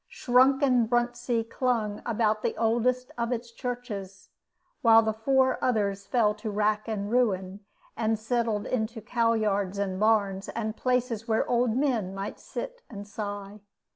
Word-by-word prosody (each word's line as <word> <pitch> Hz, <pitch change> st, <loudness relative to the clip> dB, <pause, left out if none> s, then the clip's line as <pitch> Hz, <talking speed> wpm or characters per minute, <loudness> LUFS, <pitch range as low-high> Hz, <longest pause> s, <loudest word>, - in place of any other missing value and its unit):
Shrunken 255 Hz, -1 st, +3 dB
Bruntsea 240 Hz, -1 st, 0 dB
clung 230 Hz, -4 st, -1 dB
about 215 Hz, -2 st, +1 dB
the -, -, -2 dB
oldest 240 Hz, +3 st, +1 dB
of 235 Hz, +1 st, -1 dB
its 235 Hz, -1 st, -3 dB
churches, 230 Hz, -7 st, -6 dB, 0.5 s
while 225 Hz, -3 st, +7 dB
the 220 Hz, 0 st, 0 dB
four 260 Hz, +4 st, +1 dB
others 200 Hz, -5 st, 0 dB
fell 220 Hz, -4 st, +2 dB
to 215 Hz, +1 st, -6 dB
rack 210 Hz, +1 st, 0 dB
and 210 Hz, -2 st, -3 dB
ruin, 195 Hz, -6 st, +1 dB, 0.4 s
and 220 Hz, -1 st, 0 dB
settled 225 Hz, -2 st, -1 dB
into 225 Hz, -1 st, -2 dB
cow 230 Hz, +1 st, +1 dB
yards 200 Hz, -3 st, 0 dB
and 190 Hz, -2 st, -2 dB
barns, 200 Hz, -3 st, +1 dB
and 220 Hz, -1 st, -3 dB
places 250 Hz, -3 st, -1 dB
where 220 Hz, -1 st, +1 dB
old 240 Hz, -1 st, +1 dB
men 235 Hz, -9 st, 0 dB
might 195 Hz, +1 st, -5 dB
sit -, -, -7 dB
and 205 Hz, -3 st, -8 dB
sigh. 205 Hz, -1 st, -6 dB
225 Hz, 145 wpm, -27 LUFS, 210-245 Hz, 0.5 s, while